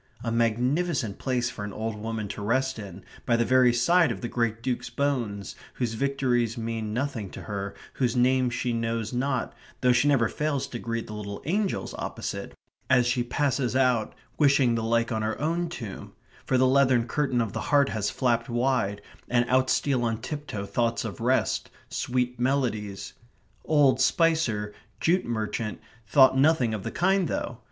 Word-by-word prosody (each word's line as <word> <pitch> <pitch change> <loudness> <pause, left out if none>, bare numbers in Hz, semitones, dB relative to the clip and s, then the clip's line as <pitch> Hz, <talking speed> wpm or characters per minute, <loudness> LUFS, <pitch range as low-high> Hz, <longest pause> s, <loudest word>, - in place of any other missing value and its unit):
A 115 - -2
magnificent 120 - 0
place 125 -2 -1
for 105 - -7
an 105 - -5
old 110 +2 -4
woman 110 0 -4
to 105 - -6
rest 130 +4 0
in, 100 -2 -9 0.2
by 120 - +4
the 115 0 +2
very 130 -1 +5
side 150 +6 +3
of 95 - -5
the - - -2
great 115 -1 -1
Duke's 125 -2 -2
bones, 120 -9 -2 0.2
whose 120 -3 -2
victories 125 -2 0
mean 115 -2 -3
nothing 120 -4 -2
to - - -9
her, 100 -1 -5 0.2
whose 125 -3 0
name 130 +1 +3
she 120 0 -2
knows 115 0 -2
not, 130 +1 -1 0.3
though 125 -1 +4
she 125 +4 +3
never 135 -5 +4
fails 150 0 -1
to 120 - -5
greet 115 0 -3
the 105 - -8
little 100 -1 -6
angels 195 +5 -1
opposite, - - -5 0.3
as 125 -2 +5
she 125 0 +1
passes 130 0 0
out, 125 -4 +2 0.2
wishing 140 -4 +4
the 115 - 0
like 115 +1 +1
on 110 -1 -1
her 110 0 -2
own 170 +3 -1
tomb, 115 - -7 0.3
for 130 - +2
the 130 - +4
leathern 130 -2 +3
curtain 135 -1 0
of 115 -4 -1
the - - -3
heart 145 -2 +4
has 105 -2 -1
flapped 120 -1 0
wide, 120 -5 0 0.3
and 120 0 +2
out 130 0 +3
steal 135 -4 +1
on 115 -1 -1
tiptoe 145 -6 -5
thoughts 115 +4 0
of 110 0 -6
rest, 130 +3 +1 0.2
sweet 125 -1 -1
melodies.... 115 -7 -1 0.5
Old 140 -4 +4
Spicer, 130 -10 +2 0.3
jute 180 +3 +2
merchant, 110 -1 -3 0.3
thought 130 +2 +6
nothing 135 -4 +3
of 105 - -3
the - - -4
kind 190 0 +2
though. 120 - -3
120 Hz, 175 wpm, -26 LUFS, 115-135 Hz, 0.5 s, thought